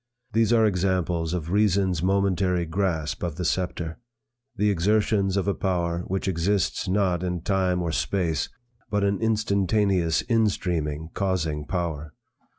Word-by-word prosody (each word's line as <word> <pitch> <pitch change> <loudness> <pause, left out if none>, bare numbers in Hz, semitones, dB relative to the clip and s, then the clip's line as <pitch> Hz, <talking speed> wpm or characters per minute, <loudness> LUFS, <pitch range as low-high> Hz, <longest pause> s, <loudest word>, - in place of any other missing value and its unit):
These 115 0 +3
are 115 -2 +5
examples 90 -4 0
of 85 -2 -3
Reason's 95 -4 +2
momentary 95 -2 +1
grasp 80 -2 -1
of 85 -4 -3
the 90 +1 -3
sceptre; 85 -1 -2 0.6
the 105 +1 +2
exertions 100 +1 +1
of 100 - 0
a 100 - +2
power 85 -3 -1
which 95 +1 -2
exists 95 +1 0
not 90 -2 +1
in 90 -2 -2
time 90 -1 +1
or 85 - -1
space, 80 -4 -1 0.4
but 105 -1 0
an 100 -1 +1
instantaneous 100 -5 +1
in 115 -3 +3
streaming 80 -5 -2
causing 80 -7 -1
power. 80 -4 -3
95 Hz, 140 wpm, -25 LUFS, 85-100 Hz, 0.6 s, are